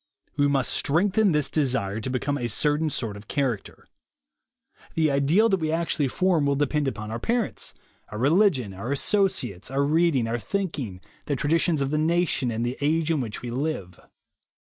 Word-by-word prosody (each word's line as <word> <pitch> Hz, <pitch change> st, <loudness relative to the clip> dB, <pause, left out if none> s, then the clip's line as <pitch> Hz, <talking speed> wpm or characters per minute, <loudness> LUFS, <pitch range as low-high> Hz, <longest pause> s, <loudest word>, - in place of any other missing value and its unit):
We 145 Hz, -1 st, +3 dB
must 135 Hz, -2 st, +1 dB
strengthen 190 Hz, +7 st, +2 dB
this 150 Hz, -3 st, +1 dB
desire 125 Hz, -9 st, 0 dB
to 130 Hz, -, -4 dB
be 130 Hz, -, 0 dB
come 145 Hz, +3 st, -1 dB
a 120 Hz, -4 st, -2 dB
certain 150 Hz, +7 st, +1 dB
sort 115 Hz, -7 st, -4 dB
of 100 Hz, +1 st, -12 dB
character. 130 Hz, -7 st, -2 dB, 1.1 s
The 155 Hz, -2 st, +2 dB
ideal 145 Hz, +11 st, +3 dB
that 195 Hz, -2 st, +2 dB
we 155 Hz, -1 st, -1 dB
actually 165 Hz, -3 st, 0 dB
form 170 Hz, 0 st, +1 dB
will 140 Hz, -, +2 dB
depend 145 Hz, +1 st, 0 dB
upon 110 Hz, -4 st, -4 dB
our 115 Hz, -, -3 dB
parents, 235 Hz, -, -2 dB, 0.3 s
our 105 Hz, -, -6 dB
religion, 140 Hz, -, +2 dB
our 115 Hz, +8 st, -5 dB
associates, 140 Hz, -, -1 dB
our 135 Hz, +1 st, +1 dB
read 160 Hz, +2 st, +3 dB
ing, 120 Hz, -3 st, +1 dB
our 120 Hz, +1 st, -1 dB
thinking, 135 Hz, -, -3 dB, 0.2 s
the 145 Hz, -, -1 dB
traditions 155 Hz, +1 st, +1 dB
of 135 Hz, -, -2 dB
the 150 Hz, -, +1 dB
nation 160 Hz, -5 st, +1 dB
and 115 Hz, +1 st, -2 dB
the 120 Hz, +2 st, -3 dB
age 160 Hz, +2 st, +1 dB
in 155 Hz, -4 st, +1 dB
which 110 Hz, -2 st, -6 dB
we 120 Hz, -, -4 dB
live. 120 Hz, -, -3 dB
145 Hz, 180 wpm, -25 LUFS, 120-160 Hz, 1.1 s, We